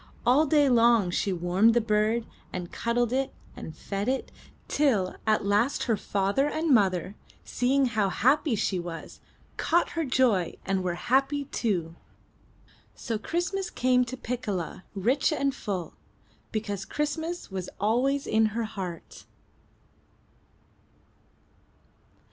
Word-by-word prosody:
All 280 +6 +4
day 290 0 +4
long 235 -6 +4
she 195 - 0
warmed 185 +6 +3
the - - +5
bird, 220 +1 +1 0.3
and 180 -1 -5
cuddled 235 0 0
it, 265 +1 0 0.2
and 160 0 -9
fed 200 +3 -3
it, 265 0 -2 0.4
till 225 -11 +1
at 215 -2 +2
last 210 +7 +2
her 230 - +1
father 205 +8 0
and 315 -1 +1
mother, 190 -4 +2 0.3
seeing 265 +2 +1
how 215 -5 +1
happy 265 - +2
she 195 -2 0
was, 170 -1 -8 0.4
caught 345 +1 +2
her 330 - -1
joy 245 - +2
and 190 -1 0
were 175 -1 -1
happy, 270 +8 +1
too. 185 - -2 1.0
So 225 -2 -3
Christ 350 - -2
mas 390 -1 -2
came 250 0 +2
to 255 +2 -6
Piccola 210 -9 -4
rich 245 - +2
and 280 -3 0
full, 190 -8 -4 0.6
because 205 -3 -3
Christmas 320 - -3
was 185 -2 -4
always 255 +7 +1
in 220 0 +3
her 235 - 0
heart. 185 -6 -7
230 Hz, 130 wpm, -27 LUFS, 195-270 Hz, 1.0 s, the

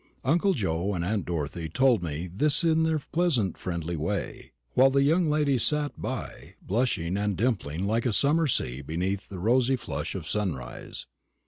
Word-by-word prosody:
Uncle 175 +7 +2
Joe 95 - -1
and 85 -1 -2
aunt 100 0 -1
Dorothy 80 0 -3
told 125 +3 +3
me 80 0 -3
this 140 - +2
in 160 -1 +3
their 160 -1 +2
pleasant 140 - 0
friendly 85 -2 -4
way; 85 +6 -3 0.2
while 130 +2 +6
the 135 +1 +3
young 160 +3 +3
lady 150 -3 +2
sat 150 +4 +2
by, 130 -5 -6
blushing 100 -5 -1
and 100 -2 -1
dimpling 95 - -1
like 115 +4 +1
a - - +1
summer 150 +7 +3
sea 65 - 0
beneath 90 +7 -3
the 95 - -7
rosy 120 +7 +2
flush 75 - -4
of 85 -5 -5
sunrise. 80 - -4
105 Hz, 165 wpm, -27 LUFS, 85-140 Hz, 0.2 s, while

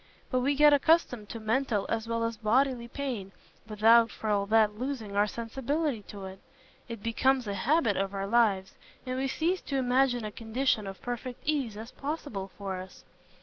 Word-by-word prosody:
But 255 - +2
we 275 +3 +1
get 295 +1 +7
accustomed 280 -7 +2
to 230 - -6
mental 220 -1 0
as 225 0 -2
well 230 0 -1
as 230 0 -1
bodily 235 +3 +1
pain, 235 -7 -4 0.4
without, 225 +1 +5
for 215 - -3
all 200 -1 +1
that, 215 -1 +3
losing 245 -6 -4
our 205 +1 +3
sensibility 265 +4 -2
to 200 -2 -8
it. 190 0 -9 0.5
It 230 -3 -7
becomes 255 +3 +2
a 200 - -2
habit 235 - +2
of 195 0 -1
our 195 0 -2
lives, 200 -3 +2 0.3
and 255 0 -3
we 270 - 0
cease 340 +7 0
to 275 - -3
imagine 250 -2 +2
a 210 - -4
condition 225 0 -1
of 195 0 -9
perfect 245 0 -5
ease 275 -9 -1
as 225 +3 -8
possible 275 -10 -5
for 195 -2 -4
us. 185 0 -10
230 Hz, 185 wpm, -29 LUFS, 210-265 Hz, 0.5 s, get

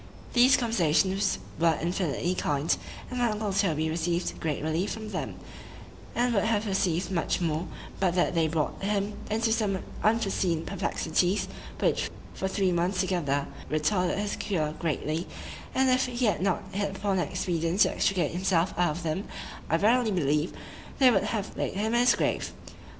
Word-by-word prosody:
These 250 +2 +6
conversations 195 -4 +2 0.2
were 165 -1 +3
infinitely 175 0 -1
kind; 145 -3 +1 0.4
and 250 - -3
my 240 -1 +3
uncle 210 -2 -2
Toby 160 -6 +1
received 170 +2 -1
great 150 -3 -2
relief 160 +5 0
from 220 -1 -6
them, - - -4 0.8
and 245 0 +2
would 200 - +2
have 220 -1 +1
received 190 -3 0
much 170 -4 0
more, 165 0 -1 0.3
but 180 -2 +2
that 175 - +2
they 165 -2 +2
brought 155 -1 -1
him 200 +1 0 0.2
into 225 +1 +1
some 210 -4 +1 0.3
unforeseen 195 -7 +1
perplexities, 185 -1 0 0.3
which, - - +1 0.2
for 190 - -2
three 190 -1 +1
months 180 +2 0
together, 170 -7 0 0.2
retarded 175 +5 +1
his 205 0 -1
cure 160 -7 -1
greatly; 160 +1 -1 0.5
and 265 0 +4
if 255 0 +3
he 245 0 -1
had 210 - +1
not 190 -2 +1
hit 200 -1 -2
upon 195 -1 0
an - - 0
expedient 175 0 -1
to - - +6
extricate 190 -3 +1
himself 180 0 +1
out 170 -3 +2
of 175 - -7
them, 165 +5 -2 0.4
I 165 - +3
verily 225 +4 +3
believe 150 -4 +1 0.5
they 260 -2 +6
would 195 - +2
have 210 -3 -3
laid - - -2
him 215 +3 0
in 240 - +4
his 245 +1 +5
grave. - - -1
190 Hz, 165 wpm, -28 LUFS, 165-210 Hz, 0.8 s, These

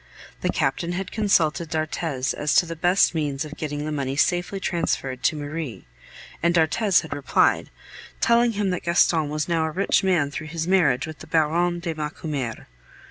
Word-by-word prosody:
The - - 0
Captain 145 +6 -1
had 190 +1 -4
consulted 170 -6 +1
d'Arthez 155 -4 -2
as 150 -1 -1
to - - +5
the 165 0 -6
best 175 +4 +3
means 150 -2 -2
of 150 0 -9
getting 150 -1 -4
the 155 - -3
money 135 -2 -2
safely 175 +6 +1
transferred 150 -8 -2
to - - +2
Marie, 145 - -5 0.6
and 170 +1 +2
d'Arthez 175 +4 +3
had 160 - -6
replied, 145 - +1 0.5
telling 235 0 +3
him 200 -2 0
that 180 - -2
Gaston 170 -3 +2
was 150 0 -2
now 165 -2 +1
a - - -1
rich 190 +6 +1
man 170 -7 +2
through 155 +1 -6
his 165 +1 -4
marriage 160 -9 +3
with 155 -2 -9
the - - -11
Baronne 170 +2 +1
de 170 -2 -3
Macumer. 150 -5 -4
160 Hz, 180 wpm, -24 LUFS, 150-175 Hz, 0.6 s, to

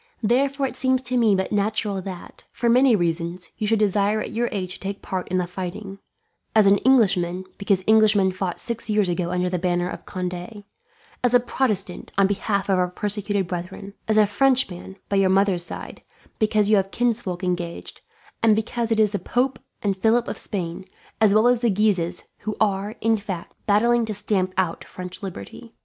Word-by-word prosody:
"Therefore 270 +5 +2
it 265 - -4
seems 260 0 +1
to 250 0 -3
me 225 -5 +4
but 190 0 -2
natural 210 -1 0
that, 185 -2 -9
for 235 +3 -2
many 250 0 +5
reasons, 170 0 -1
you 215 - -1
should 225 +1 +3
desire 205 0 +2
at - - -4
your 240 +1 -1
age 185 -3 -3
to - - -11
take 195 +1 -6
part 185 -1 -4
in 185 - -1
the 180 - 0
fighting; 190 +2 -6 0.6
as 215 -2 +6
an 200 0 +5
Englishman, 190 -8 +2
because 200 -2 +1
Englishmen 215 -3 +5
fought 185 -1 -4
six 235 -1 -2
years 210 -3 +2
ago 175 0 -1
under 180 0 0
the 180 0 -1
banner 175 0 0
of - - -8
Conde; 180 +3 -5 0.6
as 245 0 +3
a - - +7
Protestant, 215 -7 -1
on 195 - +5
behalf 200 0 -1
of 190 -2 +2
our 180 - +2
persecuted 205 +1 -2
brethren; 180 +3 -6
as 215 0 +2
a 215 - +6
Frenchman 205 -5 +1
by 200 - 0
your 195 -1 +3
mother's 190 -2 +2
side, - - -8 0.4
because 215 -1 +2
you 215 0 +5
have 195 0 0
kinsfolk 220 -6 -1
engaged, 175 -2 -4 0.4
and 225 -2 +5
because 230 +1 -2
it 220 - +2
is 215 -2 +4
the 205 - -2
Pope 250 +8 -1 0.2
and 200 -2 +1
Philip 225 +5 +2
of - - -3
Spain, 175 -4 -3 0.4
as 215 -2 +6
well 215 +3 +5
as 245 -1 +3
the 240 - +2
Guises, 190 -4 +1 0.2
who 215 0 -5
are, 205 0 0
in 225 0 +3
fact, 195 -4 -6
battling 235 +3 +3
to 215 -1 -4
stamp 190 -2 0
out 180 -3 -1
French 180 +2 -9
liberty. 195 - -9
200 Hz, 195 wpm, -23 LUFS, 185-220 Hz, 0.6 s, a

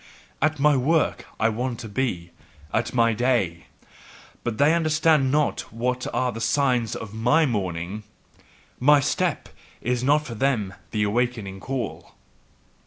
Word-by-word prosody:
At 155 +2 +2
my 145 +1 +4
work 155 +5 +1
I 110 - +3
want 120 +2 -2
to 115 - -7
be, 100 -7 -2 0.4
at 115 - 0
my 115 -2 +3
day: 110 -8 0 0.8
but 120 -2 -3
they 145 +3 +4
understand 155 -4 +3
not 150 0 0
what 125 +2 -2
are 125 +1 0
the 115 - -7
signs 125 -4 +1
of 110 -2 -7
my 125 +9 +3
morning, 95 - -3 0.8
my 145 +3 +6
step 165 +4 -1 0.3
is 125 0 -1
not 150 +3 +3
for 120 - -6
them 115 -5 0 0.2
the 105 -2 0
awakening 110 -3 -1
call. 130 0 -5
125 Hz, 140 wpm, -24 LUFS, 110-140 Hz, 0.8 s, my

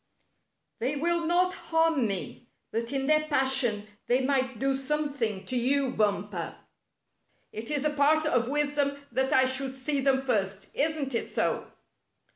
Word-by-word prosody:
" - - -51
They 260 +5 0
will 335 +2 0
not 360 +2 +2
harm 325 - +1
me, 200 +4 -5 0.2
but 230 +2 -2
in 270 -1 -1
their 305 +1 +2
passion 265 -7 +2 0.2
they 250 +2 +3
might 260 -2 0
do 270 +3 +1
something 270 -8 -2
to 255 - -4
you. 265 +2 +1
Bumper. 205 -5 -1 1.0
It 225 +2 -7
is 295 -2 0
the 300 - +1
part 300 +2 +3
of 245 -5 +1
wisdom 290 -1 0
that 265 +3 0
I 260 -3 +5
should 260 0 -1
see 275 +1 -1
them 265 0 +2
first. 200 -6 -1
Isn't 290 -2 0
it 230 - -2
so?" - - -1
270 Hz, 155 wpm, -28 LUFS, 240-295 Hz, 1.0 s, I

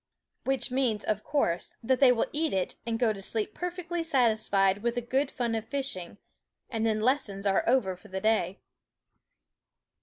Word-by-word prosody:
Which 270 -1 0
means, 250 -5 +1
of 215 -1 -1
course, 180 - -1
that 255 +2 +2
they 265 -3 +7
will 240 - +2
eat 315 +1 0
it 190 -1 0
and 230 -1 0
go 225 -2 +2
to 195 - -8
sleep 215 +2 -2
perfectly 350 -1 -3
satisfied 215 -9 +2
with 235 +1 0
the 245 - 0
good 265 +4 0
fun 240 -4 -2
of 225 -1 -2
fishing; 265 -11 -4 0.5
and 225 -2 -1
then 215 -1 +1
lessons 220 -6 0
are 195 -1 +3
over 220 -8 +2
for 180 - -16
the 190 -1 -4
day. 200 -4 +1
225 Hz, 175 wpm, -29 LUFS, 205-265 Hz, 0.5 s, they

